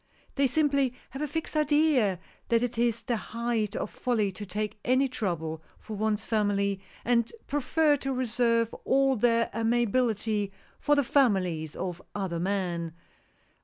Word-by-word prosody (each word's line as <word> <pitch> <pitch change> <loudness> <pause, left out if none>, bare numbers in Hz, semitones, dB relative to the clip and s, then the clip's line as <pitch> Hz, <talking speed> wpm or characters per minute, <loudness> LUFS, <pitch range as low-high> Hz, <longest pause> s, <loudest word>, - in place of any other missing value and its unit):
They 275 -1 +3
simply 280 -2 +2 0.2
have 270 - -6
a 300 - 0
fixed 320 +2 -4
idea 295 - +3 0.3
that 230 0 +2
it 245 -1 -2
is 235 -1 +1
the 240 - 0
height 230 -1 -2
of - - -3
folly 220 -5 0
to 205 +2 -8
take 210 +2 -3
any 255 +3 +3
trouble 170 -10 -3 0.2
for 220 - -8
one's 215 0 0
family, 200 -2 +1 0.2
and 235 -1 +2
prefer 290 +2 +2
to 270 0 -3
reserve 235 -2 +1
all 270 0 +3
their 230 0 +2
amiability 225 -2 +1 0.3
for 295 - +3
the 285 - +3
families 185 - +1
of 180 -1 -4
other 190 -4 -2
men. 175 -3 -1
230 Hz, 145 wpm, -28 LUFS, 200-255 Hz, 0.3 s, They